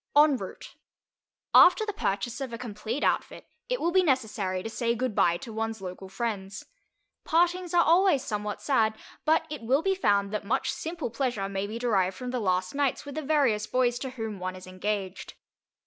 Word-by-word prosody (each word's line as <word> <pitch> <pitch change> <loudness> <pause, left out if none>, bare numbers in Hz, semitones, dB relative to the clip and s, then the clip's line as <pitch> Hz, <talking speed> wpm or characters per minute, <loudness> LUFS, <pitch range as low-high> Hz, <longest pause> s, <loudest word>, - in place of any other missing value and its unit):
EN 295 -1 +6
ROUTE - - -8 0.8
After 400 +5 +7
the 420 - -3
purchase 230 - -2
of 265 -3 -4
a 230 - -5
complete 225 +2 -4
outfit, - - 0 0.2
it - - 0
will 340 - +1
be 375 +1 +5
necessary 215 - 0
to - - -4
say 235 +1 -1
goodbye 215 -8 +2
to 225 - -9
one's 225 0 -3
local 190 0 -8
friends. 200 -3 -4 0.6
Partings 350 +1 +1
are 345 - +6
always 340 -4 +4
somewhat 210 -3 -4
sad, 220 -6 +2 0.3
but 320 +1 +3
it 300 - -5
will 265 +7 +2
be 390 - +2
found 200 - +1
that 210 - -2
much 245 +7 0
simple 325 -7 -4
pleasure 240 -6 -1
may 195 0 -3
be 220 +2 -5
derived 195 -6 +1
from 250 -1 -5
the 250 - -1
last 185 -3 0
nights 280 -1 0
with 285 - -7
the 310 - -3
various 265 -8 +2
boys 245 -1 +1
to 265 - -4
whom 220 -5 -5
one 185 0 -4
is 185 - -10
engaged. 190 +1 -4
235 Hz, 190 wpm, -28 LUFS, 200-285 Hz, 0.8 s, After